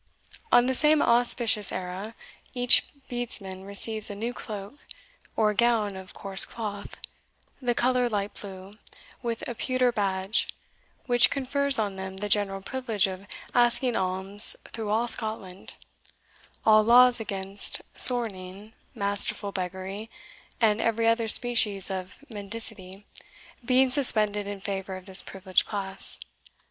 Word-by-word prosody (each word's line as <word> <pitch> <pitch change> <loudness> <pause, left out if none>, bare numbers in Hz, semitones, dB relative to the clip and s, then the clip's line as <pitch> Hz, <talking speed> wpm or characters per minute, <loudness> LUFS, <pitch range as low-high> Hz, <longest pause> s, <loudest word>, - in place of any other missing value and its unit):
On 245 - +4
the 260 - -1
same 300 +3 +2
auspicious 235 -4 +4
era, 185 +4 -7 0.4
each 245 0 +5 0.2
Bedesman 195 -6 -3
receives 215 +2 0
a 205 - -7
new 230 +4 -5
cloak, 210 +3 -10 0.6
or 215 -1 0
gown 220 -3 0
of 190 0 -12
coarse 195 -1 +3
cloth, 205 -3 -7 0.6
the 245 -2 -2
colour 250 0 0
light 205 -2 -4
blue, 190 -1 -11 0.5
with 235 -2 -5
a 240 - -5
pewter 255 +1 -1
badge, 195 -1 -2 0.6
which 245 -2 +4
confers 280 0 +1
on 205 -3 -3
them 190 0 -8
the 205 +1 -5
general 195 -2 0
privilege 235 -4 -2
of 190 +1 -8 0.3
asking 240 0 +1
alms 190 +3 +5
through 220 -2 -6
all 225 +3 -1
Scotland, 215 -5 -5 0.9
all 215 -1 +5
laws 245 +2 +4
against 195 -2 -2
sorning, 210 -4 +3 0.2
masterful 200 0 -1
beggary, 190 +3 -7 0.5
and 220 -2 +1
every 230 0 -1
other 230 0 0
species 215 -5 +4
of 190 +8 -8
mendicity, 205 -3 -3 0.6
being 255 +1 +1
suspended 215 -7 +2
in 205 -1 -7
favour 195 -1 -6
of 185 -1 -12
this 190 -1 +3
privileged 185 -1 -2
class. 195 -2 -2
210 Hz, 130 wpm, -25 LUFS, 195-240 Hz, 0.9 s, each